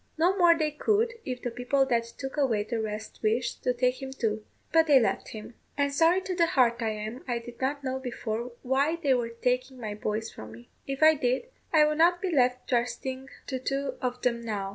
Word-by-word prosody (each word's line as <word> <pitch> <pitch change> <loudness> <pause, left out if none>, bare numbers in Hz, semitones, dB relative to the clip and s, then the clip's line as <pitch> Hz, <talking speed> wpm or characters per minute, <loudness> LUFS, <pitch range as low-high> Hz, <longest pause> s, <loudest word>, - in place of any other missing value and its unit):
No 350 +4 +3
more 345 -3 +5
they 310 -1 0
could, 435 +9 +1
if 250 -2 -5
the 245 - -2
people 250 +3 +1
that 235 -3 +1
took 265 +3 -7
away 250 -8 +1
the 225 +1 -3
rest 215 0 -5
wished 230 +3 0
to 250 - +2
take 250 +1 0
him 265 - -5
too. 220 -5 -2 0.3
But 325 0 +5
they 285 -3 +7
left 210 -5 0
him; 215 +2 -9 0.2
and 280 -1 +1
sorry 335 +5 +4
to 375 0 -4
the 340 -2 +3
heart 245 -6 +2
I 225 - 0
am 215 +4 -5
I 240 -1 0
did 235 +1 -10
not 280 +2 -1
know 260 0 -2
before 240 -1 -4
why 275 +5 +2
they 290 -6 +1
were 240 -2 0
taking 250 +2 -1
my 215 -3 -4
boys 215 +1 -3
from 110 0 -10
me; 120 +1 -14 0.2
if 275 +2 -1
I 315 0 +8
did, 260 - -1 0.2
I 310 -2 +6
would 305 +1 0
not 350 +2 +5
be 360 -3 -1
left 250 -1 +2
trusting 260 +2 -2 0.2
to 260 -2 -3
two 275 +2 -2
of 250 0 -3
'em 235 -1 +1
now." 205 -4 -3
255 Hz, 225 wpm, -28 LUFS, 235-285 Hz, 0.3 s, I